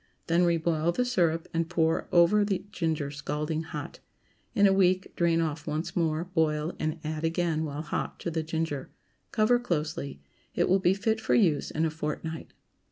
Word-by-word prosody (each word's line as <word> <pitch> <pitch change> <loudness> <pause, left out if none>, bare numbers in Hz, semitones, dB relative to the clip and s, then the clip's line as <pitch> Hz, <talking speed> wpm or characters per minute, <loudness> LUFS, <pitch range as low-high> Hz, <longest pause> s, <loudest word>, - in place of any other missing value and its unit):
Then 170 +2 +3
reboil 165 -1 +1
the 250 - +1
syrup, 170 -8 +1
and 165 0 0
pour 165 -2 +1
over 175 +5 +5
the 200 -2 -1
ginger 155 -4 -1
scalding 150 +2 -3
hot. 165 - -7 0.6
In 205 -2 +5
a 195 - +6
week 185 -1 +2
drain 170 -1 +2
off 155 -2 -3
once 160 +3 -3
more, 160 -2 +1
boil, 160 -2 0
and 155 +1 -1
add 155 0 -3
again 165 -1 0
while 150 0 -4
hot 150 - -3
to 170 - -3
the 160 0 -1
ginger; 160 -3 -3 0.4
cover 235 +2 +3
closely. 155 - -3 0.4
It - - +2
will 190 +2 +4
be 185 0 +3
fit 220 +2 0
for 220 - +2
use 165 -11 +3
in 160 +1 0
a 160 - 0
fortnight. 160 +1 -5
165 Hz, 175 wpm, -28 LUFS, 155-180 Hz, 0.6 s, a